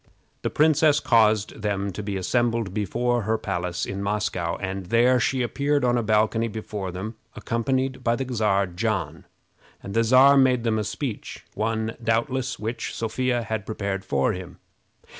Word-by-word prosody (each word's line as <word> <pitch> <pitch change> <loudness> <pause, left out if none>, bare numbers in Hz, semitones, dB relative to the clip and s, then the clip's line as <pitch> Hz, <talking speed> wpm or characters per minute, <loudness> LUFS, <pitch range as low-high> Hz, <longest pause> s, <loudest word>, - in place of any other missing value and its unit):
The - - -1
princess 155 -1 +4
caused 110 -1 +2
them 100 -1 -1
to 95 - -6
be 100 -1 -3
assembled 115 0 0
before 120 +4 0
her 110 +2 0
palace 90 -4 -3
in 100 0 -5
Moscow, 100 -4 -1
and 95 -1 -5
there 120 +4 +4
she 125 +3 +1
appeared 140 +3 0
on 120 0 +3
a 120 - +2
balcony 110 +1 +2
before 105 -3 -5
them, 105 +5 -6 0.2
accompanied 130 +2 -1
by 115 0 +2
the 135 - -3
Czar 105 -3 +2
John; 100 +4 -3 0.6
and 100 - -6
the 115 - +3
Czar 130 +4 +6
made 130 -3 +4
them 110 -2 +1
a - - -1
speech 115 +2 -5
one, 110 +1 -2
doubtless, 125 +2 0
which 115 +2 -4
Sophia 120 +2 -1
had 110 -1 -4
prepared 100 -3 -3
for 70 -1 +1
him. 90 -1 -8
110 Hz, 160 wpm, -24 LUFS, 100-120 Hz, 0.6 s, Czar